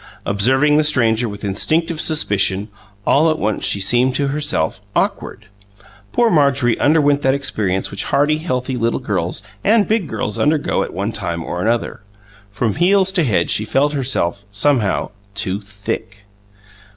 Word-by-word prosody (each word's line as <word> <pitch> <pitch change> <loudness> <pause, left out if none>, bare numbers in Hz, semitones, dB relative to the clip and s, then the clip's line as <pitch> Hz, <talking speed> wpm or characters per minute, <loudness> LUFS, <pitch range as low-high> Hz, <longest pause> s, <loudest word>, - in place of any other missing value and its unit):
Observing 130 +9 +2
the 155 - +3
stranger 120 -6 +2
with 100 0 -9
instinctive 155 - 0
suspicion, 100 -9 +2 0.4
all 155 +4 +3
at 155 - 0
once 110 -5 -2
she 100 - +2
seemed, 120 +6 +2
to 140 -1 0
herself, 145 -8 -1
awkward. 110 - -2 0.7
Poor 235 -1 +2
Marjorie 140 -6 +2
underwent 145 -1 +3
that 135 0 +2
experience 105 -9 -2
which 100 - -3
hearty, 150 +2 +1
healthy, 130 -5 -3
little 115 -1 -1
girls 95 -6 -2 0.2
and 215 0 +3
big 215 -6 0
girls 105 -3 -3
undergo 150 0 +1
at - - -4
one 100 +5 -3
time 85 -6 -4
or 90 +2 -4
another 115 -2 -1 0.5
from 105 +3 -2
heels 190 +2 +3
to 185 -3 +1
head 100 - +1
she 110 - +3
felt 140 +7 0
herself, 125 -9 -1
somehow, 110 +1 +1 0.2
too 100 0 -1
THICK. 100 0 -6
125 Hz, 150 wpm, -18 LUFS, 100-150 Hz, 0.7 s, the